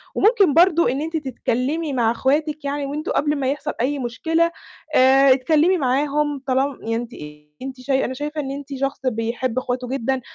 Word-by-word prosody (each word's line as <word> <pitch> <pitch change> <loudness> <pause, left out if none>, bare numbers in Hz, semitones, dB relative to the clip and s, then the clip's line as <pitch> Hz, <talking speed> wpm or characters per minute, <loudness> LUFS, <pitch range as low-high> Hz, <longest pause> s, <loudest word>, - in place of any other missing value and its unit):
وممكن 405 - +4
برضو 340 0 +5
إن 265 +4 -1
أنتِ 325 +1 -2
تتكلمي 275 +2 -2
مع 230 -3 +2
أخواتِك 295 +5 0
يعني، 285 0 -2
وأنتم 295 +3 -4
قبل 295 +1 +1
ما 270 -2 0
يحصَل 295 +1 -4
أي 280 +3 0
مشكلة، 325 +8 0 0.4
آآ، 265 +1 +6
اتكلمي 310 +7 +2
معاهم 290 +1 0
طال 260 -1 +1 0.2
يعني 225 +1 -2
أنتِ 235 +1 -4 0.5
أنتِ 260 -1 -7
شاي 265 +1 0
أنا 260 - -3
شايفة 295 +3 -4
إن 270 -1 -5
أنتِ 280 0 -7
شخص 275 +1 -2
بيحب 235 +1 -2
إخواته 250 -1 -2
جدًا، 265 0 -1
275 Hz, 175 wpm, -21 LUFS, 255-300 Hz, 0.5 s, آآ